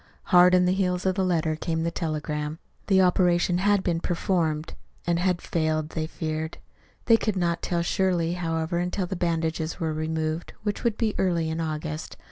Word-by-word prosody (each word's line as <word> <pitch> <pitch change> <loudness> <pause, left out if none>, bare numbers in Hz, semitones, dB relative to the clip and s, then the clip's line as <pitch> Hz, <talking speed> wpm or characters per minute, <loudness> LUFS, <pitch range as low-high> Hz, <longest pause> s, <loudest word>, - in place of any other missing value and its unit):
Hard 180 +1 +8
on 180 0 +4
the 180 - +3
heels 180 -1 0
of 190 - +3
the 190 0 0
letter 165 -3 +1
came 160 0 -2
the 170 - 0
telegram. 150 -1 -3 0.3
The 190 -2 +5
operation 175 -1 +3
had 200 0 +3
been 170 -2 0
performed 165 -3 -1 0.3
and 170 0 +1
had 180 -1 0
failed, 155 -2 0
they 160 -1 -3
feared. 160 0 -4 0.5
They 230 - +6
could 215 -2 -1
not 170 -2 0
tell 170 -1 0
surely, 175 -2 +1
however, 165 -1 -1
until 180 +2 -1
the 190 - -4
bandages 165 -2 -1
were 160 -2 -1
removed, 155 +1 -2
which 205 -1 -2
would 235 -3 +1
be 220 -3 +1
early 170 -4 +1
in 160 +1 -2
August. 155 0 -4
170 Hz, 180 wpm, -26 LUFS, 160-180 Hz, 0.5 s, Hard